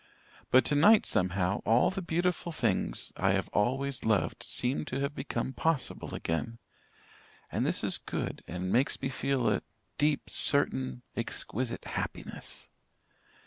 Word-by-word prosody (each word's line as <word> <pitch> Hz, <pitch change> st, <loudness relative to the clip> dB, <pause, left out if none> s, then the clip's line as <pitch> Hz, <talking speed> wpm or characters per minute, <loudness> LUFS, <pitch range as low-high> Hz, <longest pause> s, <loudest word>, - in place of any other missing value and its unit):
But 130 Hz, -, +5 dB
tonight 200 Hz, +10 st, +5 dB
somehow, 90 Hz, +1 st, 0 dB
all 115 Hz, -, +4 dB
the 195 Hz, 0 st, -4 dB
beautiful 175 Hz, 0 st, -1 dB
things 115 Hz, -, 0 dB
I 95 Hz, +1 st, +2 dB
have 95 Hz, -1 st, -1 dB
always 135 Hz, +5 st, 0 dB
loved 110 Hz, -3 st, +1 dB
seem 125 Hz, +3 st, 0 dB
to -, -, -3 dB
have 140 Hz, +1 st, -1 dB
become 135 Hz, -1 st, -3 dB
possible 160 Hz, 0 st, 0 dB
again 115 Hz, +8 st, -3 dB, 0.9 s
and -, -, 0 dB
this -, -, +1 dB
is -, -, +4 dB
good, -, -, -4 dB
and 90 Hz, +2 st, -3 dB
makes 130 Hz, +4 st, +2 dB
me 135 Hz, -, -2 dB
feel 130 Hz, -2 st, 0 dB
a -, -, +2 dB, 0.4 s
deep, 150 Hz, 0 st, +1 dB
certain, 65 Hz, -1 st, +2 dB
exquisite 120 Hz, +1 st, -3 dB
happiness. -, -, -5 dB
130 Hz, 135 wpm, -30 LUFS, 100-145 Hz, 0.9 s, But